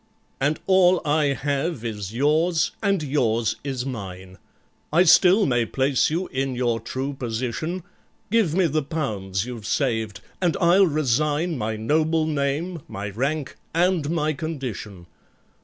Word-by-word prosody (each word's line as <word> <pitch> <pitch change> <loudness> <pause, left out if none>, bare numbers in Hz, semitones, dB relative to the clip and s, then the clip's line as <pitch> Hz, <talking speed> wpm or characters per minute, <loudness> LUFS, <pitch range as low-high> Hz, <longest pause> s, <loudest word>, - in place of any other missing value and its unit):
"And 145 +3 +1
all 185 -1 +5
I 150 0 +2
have 140 -1 -2
is 105 -4 -4
yours—and 160 - +1
yours 120 -6 0
is 130 -3 -3
mine. 95 -7 -7 0.5
I 170 +4 +5
still 185 +4 +6
may 120 -3 +2
place 135 +1 +1
you 170 +4 -1
in 135 0 -2
your 120 -2 0
true 130 +5 -4
position: 130 +8 -3 0.5
Give 210 -9 +2
me 190 -1 +3
the 155 -1 +1
pounds 105 - -3
you've 120 -4 -7
saved, 110 - -1 0.2
and 175 -3 +1
I'll 180 +3 +5
resign 150 +3 +1
My 110 -3 -2
noble 155 +8 +1
name, 155 +3 -1
my 100 -3 -5
rank, 140 +7 -2 0.2
and 170 -3 +2
my 155 -2 0
condition. 125 - -6
140 Hz, 135 wpm, -24 LUFS, 115-160 Hz, 0.5 s, still